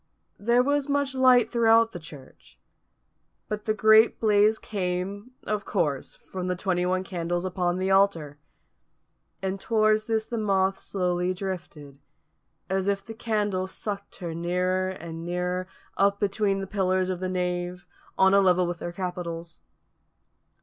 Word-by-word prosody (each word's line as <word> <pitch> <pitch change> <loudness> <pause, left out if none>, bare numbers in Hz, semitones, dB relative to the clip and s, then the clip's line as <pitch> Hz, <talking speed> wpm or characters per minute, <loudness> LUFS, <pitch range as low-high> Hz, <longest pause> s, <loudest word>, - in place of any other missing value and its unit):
There 235 +4 +3
was 285 +1 0
much 285 -1 0
light 255 -3 +5
throughout 230 -1 +4
the 175 - -7
church; 150 -4 -14 0.9
but 210 0 -4
the 215 - +1
great 220 +2 +5
blaze 215 0 +4
came, 200 +4 -4
of 210 -1 -2
course, 150 -9 -1
from 185 -1 -6
the 180 - 0
twenty 180 -1 0
one 185 0 0
candles 175 -1 -3
upon 180 -1 -1
the 190 +1 0
altar. 170 -7 +2 1.0
And 190 +1 -2
towards 215 0 +2
this 220 -1 0
the 235 0 -4
moth 195 -2 +2
slowly 180 -2 -1
drifted, 170 -7 -7 0.7
as 190 0 -1
if 200 -1 0
the 225 - -7
candles 205 -4 -1
sucked 200 -1 -5
her 170 -3 -5
nearer 180 +2 0
and 165 -3 -7
nearer, 180 +1 -2 0.3
up 200 +1 +3
between 200 -1 0
the - - -3
pillars 185 -2 0
of 180 - -4
the 185 0 -2
nave, 180 -1 -2 0.3
on 190 0 +5
a 200 - +6
level 180 -1 +3
with 175 -1 -4
their 175 - -5
capitals. 170 -2 -5
190 Hz, 150 wpm, -26 LUFS, 180-210 Hz, 1.0 s, a